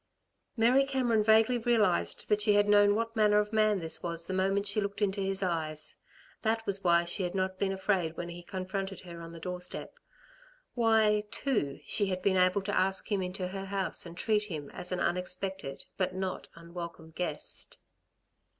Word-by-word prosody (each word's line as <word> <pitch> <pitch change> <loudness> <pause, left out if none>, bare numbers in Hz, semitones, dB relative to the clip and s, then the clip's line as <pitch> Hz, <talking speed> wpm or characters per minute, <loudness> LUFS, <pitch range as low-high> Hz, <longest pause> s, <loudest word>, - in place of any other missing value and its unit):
Mary 245 +4 +5
Cameron 255 -5 +1
vaguely 220 +3 +4
realised 220 -6 +2
that 210 0 +2
she 210 0 +4
had 205 0 +4
known 205 0 +5
what 230 +1 -2
manner 210 -1 +4
of 210 +1 +1
man 215 -1 +3
this 165 -3 -4
was 170 -1 -2
the 185 - -3
moment 195 +2 +1
she 205 +1 0
looked 200 0 -3
into 200 -1 0
his 195 0 -1
eyes. 155 -3 -2 0.5
That 225 0 0
was 200 0 -1
why 170 -1 +4
she 175 +3 -2
had 180 0 -2
not 185 0 -1
been 195 -1 +1
afraid 190 -4 0
when 175 - -4
he 175 0 -8
confronted 190 +1 -4
her 170 -2 -9
on 165 0 -8
the 170 - -9
doorstep; 180 +1 -5 0.8
why, 220 -3 +3
too, 210 - -1
she 205 -3 +1
had 185 -1 -3
been 195 -1 +3
able 185 +2 +3
to 205 +1 -2
ask 190 +3 +1
him 200 -2 +1
into 180 0 -3
her 195 +1 -5
house 195 0 -2
and 170 0 -11
treat 215 -1 +1
him 155 -8 -6
as 180 - -5
an 180 - -1
unexpected, 180 -4 -2
but 185 -1 -1
not 190 -1 -3
unwelcome 170 -1 -8
guest. 160 -3 -4
195 Hz, 185 wpm, -30 LUFS, 180-210 Hz, 0.8 s, Mary